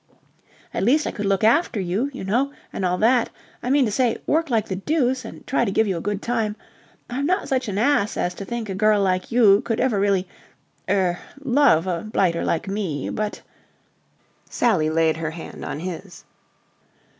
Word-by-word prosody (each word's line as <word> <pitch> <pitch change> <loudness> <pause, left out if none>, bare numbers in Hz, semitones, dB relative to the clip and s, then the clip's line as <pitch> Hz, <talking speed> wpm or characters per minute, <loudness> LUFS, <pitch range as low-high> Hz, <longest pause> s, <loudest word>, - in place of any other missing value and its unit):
At - - -2
least 280 +9 +3
I - - -1
could 205 -1 -3
look 195 0 +1
after 235 +1 +3
you, 195 +9 -1
you 265 - -7
know, 245 +9 +1 0.2
and - - -3
all 180 0 +1
that... 235 +3 +3 0.3
I 250 - -3
mean 275 0 +4
to 215 - -1
say, 245 +1 +1
work 320 0 +1
like 225 -4 +1
the 190 - -3
deuce 260 +2 0
and 225 - -10
try 270 - +1
to 225 - 0
give 220 +3 +3
you 195 -3 -1
a 165 - -4
good 205 +1 -3
time... 225 -3 -1 0.5
I'm 275 +4 -2
not 370 +3 0
such 260 -2 0
an 200 -2 -3
ass 225 -3 +2
as 175 - -1
to - - -7
think 235 +1 -4
a 195 - -3
girl 210 +2 +3
like 185 -1 0
you 215 -4 +5
could 230 -3 -2
ever 235 -6 +1
really... 195 -2 +1 0.6
er... 185 -3 +1 0.2
love 260 - +4
a 175 -3 -2
blighter 185 -5 0
like 165 - -1
me, 195 -8 -3
but..." 215 -1 -3 1.1
Sally 185 -11 +2
laid 160 0 +2
her 160 -1 -2
hand 160 +1 -9
on 150 - -5
his. 180 +1 -7
210 Hz, 195 wpm, -23 LUFS, 185-245 Hz, 1.1 s, you